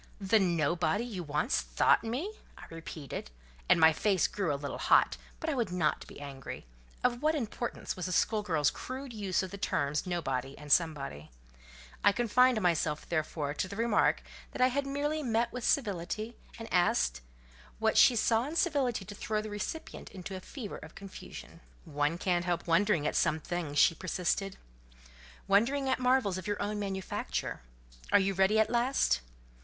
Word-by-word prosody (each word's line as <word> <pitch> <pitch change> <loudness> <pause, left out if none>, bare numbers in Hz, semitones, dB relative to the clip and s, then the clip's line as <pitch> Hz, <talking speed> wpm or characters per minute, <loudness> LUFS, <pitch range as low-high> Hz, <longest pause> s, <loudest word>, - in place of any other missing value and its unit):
"The 205 +2 +3
nobody 170 +2 +1
you 210 -7 -5
once 155 - 0
thought - - +3
me!" 265 - -3 0.2
I - - -11
repeated, 160 - -7 0.4
and - - +6
my 160 0 +7
face 195 +2 +2
grew 195 -6 -1
a - - 0
little 140 0 -5
hot; - - +4 0.2
but 320 - -5
I 315 - +1
would 235 -8 -1
not 170 -4 0
be - - -11
angry: 135 - -8 0.4
of 245 0 +1
what 310 +1 +2
importance 240 -3 -3
was 180 0 -4
a - - -3
school 215 +3 +2
girl's 160 -8 +1
crude 260 0 -7
use 200 -3 -1
of 185 - -6
the 200 - -7
terms 145 -4 -1
nobody 135 -6 -2
and 150 -1 -9
somebody? 140 - +1 0.7
I 205 - +6
confined 240 +1 +4
myself, 160 -4 0
therefore, 155 -3 -2
to 170 - -2
the 200 - -7
remark 230 0 +2 0.3
that - - -7
I 255 0 +5
had 280 +2 -1
merely 295 +3 -1
met 235 -3 0
with 250 -1 -5
civility; 215 -1 -1 0.2
and 225 - -7
asked 65 - +2 0.6
"what - - +1
she 245 - +7
saw 230 +2 +2
in 310 - -6
civility 275 - +1
to 205 - -8
throw 215 +1 -2
the 215 0 -5
recipient 210 +10 -5
into 190 0 -7
a - - -5
fever 215 +2 -7
of - - -12
confusion?" 190 -3 -10 0.3
"One 150 +1 0
can't 175 -1 0
help 175 -2 -1
wondering 170 -2 +2
at - - 0
some 160 -2 +2
things," 160 -2 -4
she 165 - +6
persisted. 185 +2 -2 0.9
"Wondering 245 +8 +3
at 260 - +1
marvels 250 -7 +2
of 185 - -8
your 205 - -1
own 210 0 -2
manufacture. 190 - -3 0.5
Are - - +7
you 195 0 +2
ready 195 +3 +3
at 220 - +3
last?" 240 - +2
195 Hz, 175 wpm, -31 LUFS, 165-235 Hz, 0.9 s, my